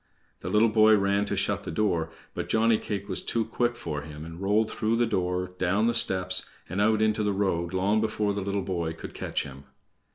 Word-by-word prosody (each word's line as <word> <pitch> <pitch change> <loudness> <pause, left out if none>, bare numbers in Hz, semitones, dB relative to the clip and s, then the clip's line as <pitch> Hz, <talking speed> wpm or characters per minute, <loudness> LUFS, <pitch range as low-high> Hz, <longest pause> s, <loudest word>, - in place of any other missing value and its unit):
The - - -5
little 110 +2 +4
boy 110 0 +6
ran 100 +1 +1
to - - -2
shut - - 0
the - - -7
door, 85 -3 0 0.2
but - - -4
Johnny 110 0 +3
cake 100 -2 -4
was 95 - -2
too 115 -1 0
quick 120 -1 0
for 75 -9 -4
him 75 +1 -9
and 80 +2 -9
rolled 105 +3 +2
through 110 0 0
the 120 +1 +3
door, 90 -3 -1
down 95 +5 +2
the 120 - +2
steps, 95 -5 +2 0.2
and 95 +4 -2
out 110 0 +3
into 110 0 +1
the 105 -1 +1
road 85 -4 0
long 100 +4 +1
before 105 -2 0
the 100 - -3
little 100 0 -2
boy 85 -4 -2
could 80 - -9
catch - - -2
him. 70 +1 -11
100 Hz, 220 wpm, -27 LUFS, 90-110 Hz, 0.2 s, boy